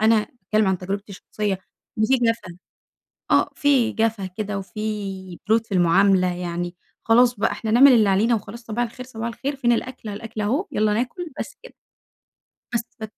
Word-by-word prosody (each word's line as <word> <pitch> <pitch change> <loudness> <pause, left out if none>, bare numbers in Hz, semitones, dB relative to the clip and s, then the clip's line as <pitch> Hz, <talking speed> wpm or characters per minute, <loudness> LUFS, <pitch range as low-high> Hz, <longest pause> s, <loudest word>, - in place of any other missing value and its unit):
أنا 220 +1 +5
أتكلّم 215 -1 0
عن 190 -1 +1
تجربتي 200 +2 -5
الشخصيّة، 200 0 -3 0.4
إن 215 - +3
في 265 +4 +4
جَفَا 230 -7 -1 0.7
آه، - - +4
في 275 -5 +3
جَفَا 220 -3 0
كده 200 +2 -4
وفي 195 -3 -5
برود 225 +1 +3
في - - -11
المعاملة، 180 +1 +4
يعني 175 0 -4 0.3
خلاص 240 +2 +5
بقى 205 - +1
إحنا 220 - -4
نعمل 260 +4 +8
اللي 220 -4 +5
علينا 215 +5 +3
وخلاص، 225 +2 -5
صباح 235 +2 -1
الخير 250 +2 -8
صباح 230 -2 -5
الخير، 275 +4 -4
فين 240 -3 +2
الأكل 235 -1 -3
أهو 200 - -4
الأكل 220 0 -7
أهو، 270 - 0
يلّا 215 0 +2
ناكل 280 - -3
بس - - -6
كده. - - -13 1.0
بس 235 - +2 0.2
ف 220 - -4
215 Hz, 180 wpm, -23 LUFS, 195-235 Hz, 1.0 s, نعمل